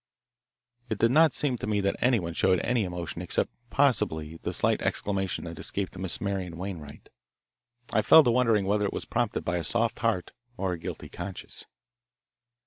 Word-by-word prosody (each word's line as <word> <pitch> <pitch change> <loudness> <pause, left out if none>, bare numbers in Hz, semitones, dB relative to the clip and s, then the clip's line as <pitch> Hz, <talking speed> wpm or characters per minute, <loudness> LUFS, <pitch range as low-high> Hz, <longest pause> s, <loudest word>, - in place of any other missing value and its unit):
It 110 - -1
did 115 +3 +3
not 160 +3 +6
seem 130 -5 -1
to - - -4
me 105 -1 +1
that 100 0 0
anyone 110 -10 +1
showed 90 +1 +3
any 120 -4 +1
emotion 90 -1 -5
except 90 - 0 0.2
possibly 80 - +1
the - - -4
slight - - +1
exclamation 95 -2 -1
that 85 -2 -7
escaped 95 -2 -3
Miss 95 -1 -1
Marian 95 -4 -3
Wainwright. 85 -6 -7 0.8
I 110 - +4
fell 160 +9 +8
to 120 - +3
wondering 115 -5 +3
whether 105 +1 +1
it - - -5
was - - -4
prompted - - -1
by 90 0 0
a 85 - -2
soft 115 +7 0
heart 110 -6 0 0.3
or 95 -2 -1
a 85 - -5
guilty - - -6
conscience. - - -8
100 Hz, 175 wpm, -28 LUFS, 90-115 Hz, 0.8 s, fell